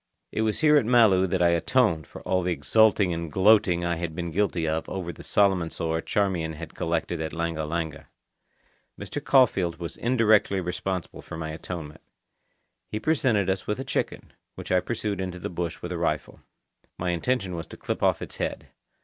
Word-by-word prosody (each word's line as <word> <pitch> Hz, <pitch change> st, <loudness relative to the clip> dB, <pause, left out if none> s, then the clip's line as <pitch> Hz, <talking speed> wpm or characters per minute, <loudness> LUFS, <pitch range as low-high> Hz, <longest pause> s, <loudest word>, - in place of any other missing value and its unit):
It -, -, -1 dB
was 110 Hz, +4 st, 0 dB
here 150 Hz, -1 st, +6 dB
at 140 Hz, -, +2 dB
Malu 110 Hz, -6 st, +5 dB
that 90 Hz, 0 st, +1 dB
I 85 Hz, -, +5 dB
atoned 85 Hz, -, +2 dB
for -, -, -11 dB
all 95 Hz, 0 st, +1 dB
the 90 Hz, 0 st, -1 dB
exulting 105 Hz, 0 st, +3 dB
and 85 Hz, -1 st, -4 dB
gloating 95 Hz, -2 st, +4 dB
I 85 Hz, -1 st, 0 dB
had 85 Hz, -2 st, -4 dB
been 85 Hz, -1 st, -4 dB
guilty 90 Hz, -3 st, 0 dB
of 80 Hz, +1 st, -2 dB
over 85 Hz, -3 st, -4 dB
the -, -, -12 dB
Solomon 95 Hz, -5 st, +2 dB
sore 80 Hz, 0 st, -2 dB
Charmian 90 Hz, -6 st, 0 dB
had 80 Hz, +2 st, -8 dB
collected 80 Hz, -1 st, -2 dB
at 80 Hz, -, -4 dB
Langa 85 Hz, -2 st, -2 dB
Langa. 80 Hz, -2 st, -3 dB, 0.9 s
Mr. -, -, -5 dB
Caulfeild 95 Hz, -11 st, +3 dB
was 85 Hz, -1 st, -6 dB
indirectly 110 Hz, -5 st, +3 dB
responsible 90 Hz, 0 st, -4 dB
for -, -, -8 dB
my 80 Hz, -1 st, -4 dB
atonement. 80 Hz, -1 st, -7 dB, 0.9 s
He 110 Hz, -, -4 dB
presented 120 Hz, -, +2 dB
us 95 Hz, 0 st, -1 dB
with 105 Hz, -, -1 dB
a -, -, -2 dB
chicken, -, -, -3 dB, 0.2 s
which -, -, -7 dB
I 90 Hz, -, +5 dB
pursued 105 Hz, -1 st, -3 dB
into 90 Hz, -1 st, -4 dB
the 90 Hz, -, -5 dB
bush 85 Hz, -1 st, -4 dB
with 90 Hz, -, -4 dB
a 85 Hz, -, -3 dB
rifle. 75 Hz, -3 st, -2 dB, 0.6 s
My 90 Hz, 0 st, -1 dB
intention 95 Hz, +2 st, -1 dB
was 85 Hz, -, -6 dB
to -, -, -10 dB
clip -, -, -4 dB
off -, -, +2 dB
its -, -, -8 dB
head. -, -, -4 dB
90 Hz, 190 wpm, -26 LUFS, 85-105 Hz, 0.9 s, here